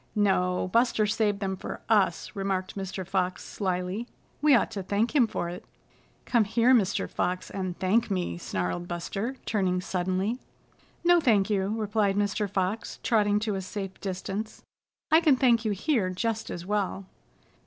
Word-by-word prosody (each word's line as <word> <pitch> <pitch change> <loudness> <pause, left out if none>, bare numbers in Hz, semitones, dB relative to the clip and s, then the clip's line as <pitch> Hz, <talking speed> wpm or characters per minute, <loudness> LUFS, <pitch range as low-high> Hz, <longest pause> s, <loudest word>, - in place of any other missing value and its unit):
"No, 185 -3 +2
Buster 230 -2 +3
saved 210 -1 0
them 190 -1 -1
for - - -6
us," 205 -6 +2
remarked 195 -2 -2
Mr. 190 -1 -4
Fox 185 0 -1
slyly. 185 +3 -2 0.3
"We 295 -2 +6
ought 235 - +2
to 205 -3 -4
thank 205 +8 0
him 250 -6 +5
for 175 - -3
it." 175 +1 -7 0.6
"Come 235 -4 +3
here, 230 +4 +4
Mr. 205 -6 +2
Fox, 180 +1 -2
and 185 -2 -4
thank 210 +6 +2
me," 180 - -2
snarled 95 - -3
Buster, 195 +8 -3
turning 190 -4 +1
suddenly. 185 +5 -1 0.6
"No, 350 0 +6
thank 215 -7 +3
you," 200 +1 0
replied 210 -2 +1
Mr. 205 0 0
Fox, 195 +3 -2
trotting 210 -3 +3
to 215 -1 -1
a 195 - -2
safe 195 0 -6
distance. 195 +3 -4 0.5
"I 320 +1 +7
can 305 -5 +5
thank 240 -3 +3
you 215 - +1
here 205 - +1
just 220 +4 -2
as 175 0 -6
well." 195 -1 -1
200 Hz, 160 wpm, -27 LUFS, 185-225 Hz, 0.6 s, I